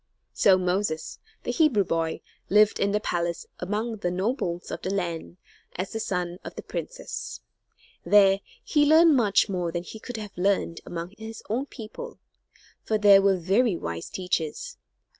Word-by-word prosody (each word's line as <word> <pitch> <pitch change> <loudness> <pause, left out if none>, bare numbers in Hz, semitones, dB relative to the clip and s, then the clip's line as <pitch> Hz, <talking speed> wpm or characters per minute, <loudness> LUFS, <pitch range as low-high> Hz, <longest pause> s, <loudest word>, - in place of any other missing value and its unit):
So 185 - +5
Moses, 180 -2 -1 0.2
the - - -1
Hebrew 295 - +3
boy, 165 -2 -1 0.3
lived 210 +1 +5
in 200 - +2
the 210 - +2
palace 170 -4 -2
among 215 +5 -2
the 180 - -1
nobles 180 - -2
of - - -5
the - - -3
land, 175 -3 -3 0.4
as 185 +2 -3
the 225 - -2
son 180 -4 -2
of - - -8
the - - -7
princess. - - -6 0.6
There 195 -1 +5 0.2
he 295 -2 +3
learned 315 +1 +6
much 210 -6 +3
more 180 -4 -2
than 175 0 -3
he 220 - -9
could 245 +1 -7
have 210 -2 -8
learned 180 -2 0
among 170 +1 -5
his 220 0 -8
own 260 +5 -1
people; 275 - -9 0.7
for 220 - +1
there 200 -2 +7
were 195 -1 +3
very 195 +5 +2
wise 85 - -5
teachers. 185 - -3
195 Hz, 160 wpm, -26 LUFS, 175-220 Hz, 0.7 s, there